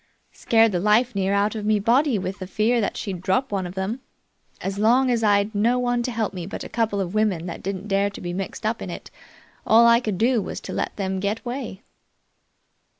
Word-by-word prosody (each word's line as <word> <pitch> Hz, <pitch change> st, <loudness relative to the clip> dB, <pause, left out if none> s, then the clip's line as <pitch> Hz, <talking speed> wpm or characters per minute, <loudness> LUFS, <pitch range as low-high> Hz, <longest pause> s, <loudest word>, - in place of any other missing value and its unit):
Scared 225 Hz, -1 st, +3 dB
the 180 Hz, -, 0 dB
life 215 Hz, +6 st, +3 dB
near 195 Hz, -1 st, 0 dB
out 200 Hz, +1 st, +1 dB
of 215 Hz, -2 st, -5 dB
me 215 Hz, 0 st, +2 dB
body 245 Hz, +4 st, +2 dB
with 190 Hz, +1 st, -4 dB
the 185 Hz, -, -6 dB
fear 225 Hz, +5 st, +1 dB
that 200 Hz, -, -2 dB
she'd 190 Hz, -4 st, -5 dB
drop 190 Hz, +8 st, 0 dB
one 190 Hz, -3 st, -1 dB
of 175 Hz, -, -10 dB
them. 195 Hz, +6 st, -3 dB, 0.6 s
As 195 Hz, +1 st, -4 dB
long 250 Hz, +4 st, +4 dB
as 230 Hz, -2 st, 0 dB
I'd 205 Hz, 0 st, +2 dB
no 230 Hz, +4 st, +2 dB
one 245 Hz, -1 st, 0 dB
to 245 Hz, -, -2 dB
help 225 Hz, -4 st, -2 dB
me 180 Hz, -2 st, -6 dB
but -, -, -6 dB
a -, -, -8 dB
couple 225 Hz, -3 st, -1 dB
of 185 Hz, -1 st, -3 dB
women 210 Hz, -6 st, 0 dB
that 170 Hz, -, -6 dB
didn't 195 Hz, +1 st, -5 dB
dare 200 Hz, 0 st, +1 dB
be 175 Hz, -3 st, -6 dB
mixed 195 Hz, +3 st, -5 dB
up 220 Hz, +1 st, -1 dB
in -, -, -5 dB
it, -, -, -8 dB, 0.5 s
all 230 Hz, +2 st, +6 dB
I 235 Hz, 0 st, +6 dB
could 215 Hz, -6 st, -3 dB
do 235 Hz, +2 st, +2 dB
was -, -, -5 dB
to -, -, -7 dB
let -, -, -3 dB
them 190 Hz, -1 st, -2 dB
get 205 Hz, +3 st, -2 dB
away." 240 Hz, -4 st, -6 dB
210 Hz, 225 wpm, -23 LUFS, 195-230 Hz, 0.6 s, all